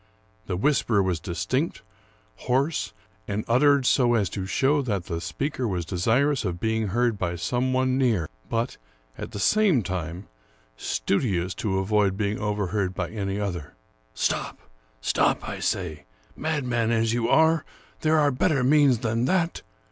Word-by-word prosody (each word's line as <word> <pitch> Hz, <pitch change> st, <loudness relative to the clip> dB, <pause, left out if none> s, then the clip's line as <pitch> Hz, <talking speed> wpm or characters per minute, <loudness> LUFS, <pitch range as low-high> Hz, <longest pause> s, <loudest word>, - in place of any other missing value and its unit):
The 90 Hz, -, -2 dB
whisper 115 Hz, -4 st, +2 dB
was 90 Hz, -3 st, -1 dB
distinct, 85 Hz, +1 st, -2 dB, 0.6 s
hoarse, 135 Hz, +6 st, +1 dB, 0.4 s
and 105 Hz, +2 st, -2 dB
uttered 140 Hz, +3 st, +4 dB
so 120 Hz, -2 st, +4 dB
as 100 Hz, -5 st, +1 dB
to 95 Hz, -1 st, -4 dB
show 140 Hz, +9 st, +2 dB
that 100 Hz, -9 st, -2 dB
the 85 Hz, 0 st, -4 dB
speaker 125 Hz, -, -2 dB
was 90 Hz, -5 st, -2 dB
desirous 120 Hz, -, +1 dB
of 90 Hz, -4 st, -3 dB
being 110 Hz, +1 st, 0 dB
heard 115 Hz, +1 st, 0 dB
by 85 Hz, -1 st, -1 dB
some 125 Hz, +9 st, -1 dB
one 130 Hz, 0 st, +1 dB
near, 110 Hz, -, +2 dB, 0.2 s
but, 115 Hz, +2 st, -1 dB, 0.4 s
at -, -, -6 dB
the -, -, -7 dB
same 185 Hz, -, +3 dB
time, 90 Hz, 0 st, -4 dB, 0.5 s
studious 95 Hz, -, -1 dB
to 95 Hz, -4 st, -2 dB
avoid 100 Hz, 0 st, +1 dB
being 105 Hz, 0 st, -1 dB
overheard 100 Hz, -2 st, -1 dB
by 85 Hz, -2 st, -3 dB
any 100 Hz, -2 st, -3 dB
other: 90 Hz, -7 st, -4 dB
— -, -, -38 dB
" -, -, -38 dB
Stop! -, -, -1 dB, 0.4 s
stop, -, -, +1 dB
I -, -, -5 dB
say, 80 Hz, -6 st, -2 dB, 0.3 s
madman 125 Hz, -7 st, -1 dB
as 115 Hz, -1 st, +2 dB
you 120 Hz, 0 st, 0 dB
are! 160 Hz, +1 st, +4 dB, 0.4 s
there 155 Hz, 0 st, +2 dB
are 145 Hz, -2 st, +4 dB
better 135 Hz, +1 st, +1 dB
means 140 Hz, -3 st, +4 dB
than 115 Hz, +1 st, 0 dB
that. 170 Hz, +3 st, 0 dB
110 Hz, 155 wpm, -25 LUFS, 95-130 Hz, 0.6 s, uttered